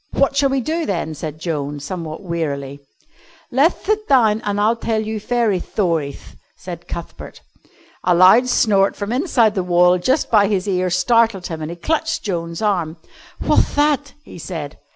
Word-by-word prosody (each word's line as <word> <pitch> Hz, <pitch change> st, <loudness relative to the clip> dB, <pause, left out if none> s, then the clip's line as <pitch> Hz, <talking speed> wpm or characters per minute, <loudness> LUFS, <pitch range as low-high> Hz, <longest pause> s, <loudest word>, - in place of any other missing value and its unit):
"What 275 Hz, 0 st, +1 dB
shall 280 Hz, -1 st, +3 dB
we 270 Hz, 0 st, 0 dB
do, 320 Hz, +5 st, -2 dB
then?" 170 Hz, -5 st, -2 dB
said 155 Hz, 0 st, -6 dB
Joan, 150 Hz, -3 st, -3 dB
somewhat 160 Hz, +3 st, -6 dB
wearily. 140 Hz, -6 st, -4 dB, 0.7 s
"Leth 280 Hz, +7 st, +2 dB
thit 430 Hz, +1 st, 0 dB
down 225 Hz, -5 st, +3 dB
an' 205 Hz, 0 st, -2 dB
I'll 215 Hz, +3 st, +2 dB
tell 225 Hz, -1 st, -2 dB
you 220 Hz, 0 st, -3 dB
fairy 230 Hz, -4 st, 0 dB
thorieth," 165 Hz, -8 st, -3 dB, 0.2 s
said -, -, -9 dB
Cuthbert. -, -, -8 dB, 0.6 s
A 180 Hz, -1 st, +3 dB
loud 190 Hz, +8 st, +6 dB
snort 200 Hz, -5 st, +3 dB
from 205 Hz, +1 st, -4 dB
inside 250 Hz, -, +2 dB
the 195 Hz, -, -1 dB
wall 180 Hz, 0 st, +3 dB
just 260 Hz, -, 0 dB
by 205 Hz, -3 st, +5 dB
his 200 Hz, -1 st, -1 dB
ear 185 Hz, -2 st, 0 dB
startled 200 Hz, +1 st, +2 dB
him, 160 Hz, -2 st, -5 dB
and 155 Hz, -, -4 dB
he 170 Hz, -, -7 dB
clutched 320 Hz, -, -1 dB
Joan's 170 Hz, -1 st, -4 dB
arm. 175 Hz, -6 st, 0 dB, 0.5 s
"What'th -, -, +2 dB
that?" 290 Hz, -1 st, +1 dB
he -, -, -12 dB
said. 155 Hz, -3 st, -7 dB
195 Hz, 170 wpm, -19 LUFS, 170-240 Hz, 0.7 s, loud